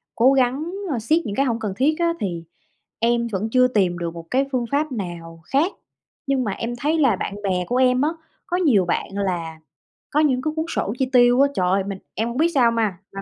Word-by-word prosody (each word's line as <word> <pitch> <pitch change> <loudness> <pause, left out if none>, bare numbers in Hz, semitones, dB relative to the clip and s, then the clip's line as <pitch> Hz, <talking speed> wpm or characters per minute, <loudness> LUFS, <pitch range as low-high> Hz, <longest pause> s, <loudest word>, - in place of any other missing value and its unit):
cố 255 +4 +5
gắng, 270 +5 +1 0.2
ơ, 245 - -1
siết 310 +9 +1
những 205 -3 -4
cái 275 - +2
hông 235 -3 -1
cần 210 -3 -3
thiết 295 +4 +2
á, 335 0 +2
thì 175 -5 -3 0.6
em 235 +1 +1
vẫn 215 0 -3
chưa 255 0 +5
tìm 190 -7 +1
được 170 -1 -4
một 165 -1 -9 0.3
phương 250 -3 0
pháp 295 +1 0
nào 170 -7 -6
khác, 295 - +1 0.6
nhưng 270 -2 +1
mà 210 - -2
em 230 +5 -4
thấy 295 +7 0
là 265 -8 +4
bạn 200 - -4
bè 180 -2 0
của 245 - -1
em 255 0 +3
á, 295 - +2 0.4
có 355 -2 -1
nhiều 260 - +3
bạn 175 - -1
là 175 -5 -3 0.5
có 300 - +1
những 275 -5 +2
cái 310 +2 -2
cuốn 315 - -1
sổ 210 - -2
chi 260 - 0
tiêu 245 +1 +5
á. 280 - +4
Trời, 185 +1 +1
mình 195 -1 -5
em 225 +2 -1
hông 235 - -5
biết 320 - +4
sao 240 -3 +5
ma 220 -5 0 0.2
mà 195 - -5
235 Hz, 230 wpm, -22 LUFS, 195-275 Hz, 0.6 s, cố